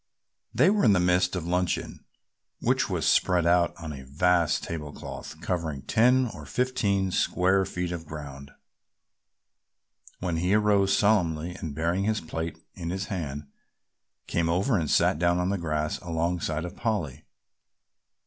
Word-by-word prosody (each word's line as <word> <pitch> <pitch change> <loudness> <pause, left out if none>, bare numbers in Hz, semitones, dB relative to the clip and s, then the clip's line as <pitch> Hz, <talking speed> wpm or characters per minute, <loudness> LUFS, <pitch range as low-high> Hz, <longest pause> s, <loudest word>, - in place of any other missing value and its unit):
They 140 - +4
were 210 -1 +2
in 105 - +6
the 95 - +3
midst 90 +1 +2
of 90 -3 -3
luncheon, 90 0 -2 0.5
which - - +1
was - - -1
spread 90 -3 +3
out 85 0 +3
on 80 -2 -6
a 70 - -8
vast 85 +5 +1
table 75 -3 -5
cloth - - -9
covering 80 -6 -3
ten 125 +3 +4
or 75 -5 -10
fifteen 100 - 0
square 95 +2 +2
feet 90 -1 -3
of 85 -2 -6
ground, 70 -2 -8 1.7
when 90 -2 -2
he 90 +4 +2
arose 100 -2 +3
solemnly 90 -6 +1
and 80 -5 -6
bearing 85 +5 0
his 110 0 +1
plate 80 0 -5 0.2
in 85 -2 -6
his 95 +3 -3
hand 75 -5 -4 0.8
came 85 -1 0
over 95 +9 +1
and 80 -6 0
sat 75 - +3
down 85 0 +2
on 90 +1 0
the 100 -1 -1
grass 75 -2 -2
alongside 85 -1 -2
of 90 +2 -7
Polly. 105 - -2
90 Hz, 150 wpm, -27 LUFS, 80-95 Hz, 1.7 s, in